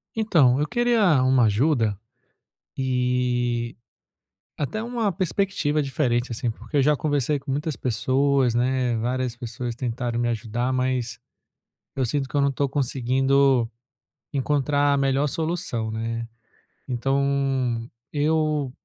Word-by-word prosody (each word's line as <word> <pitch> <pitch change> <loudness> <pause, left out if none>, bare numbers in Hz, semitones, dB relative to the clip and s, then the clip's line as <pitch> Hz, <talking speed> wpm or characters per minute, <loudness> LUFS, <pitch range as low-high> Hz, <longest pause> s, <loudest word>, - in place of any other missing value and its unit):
Então, 155 - +4
eu 150 - 0
queria 230 - +3
uma 130 -1 +4
ajuda, 110 -1 +2 0.8
e 125 -2 0 0.8
até 155 +9 -2
uma 230 -3 -1
perspectiva 185 -4 0
diferente, 130 -3 0
assim, 120 +1 -2
porque 145 +6 -5
eu - - +5
já 150 +2 +4
conversei 145 -1 0
com 135 - -6
muitas 150 +2 -2
pessoas, 130 +2 +1
né, 125 0 +1
várias 125 +1 -1
pessoas 120 0 -5
tentaram 120 -1 -2
me 120 - +1
ajudar, 115 +2 -2
mas, 125 -3 -1 0.8
eu 130 - 0
sinto 135 +3 -1
que - - -8
eu 145 - +3
não 140 - +3
estou 140 +1 -1
conseguindo 135 -1 +2 0.6
encontrar 145 +1 +1
a - - +3
melhor 135 +1 +2
solução 160 -8 -2
né, 115 +1 -3 0.6
então 135 -2 0 0.2
eu 150 -2 +1
130 Hz, 125 wpm, -24 LUFS, 120-145 Hz, 0.8 s, eu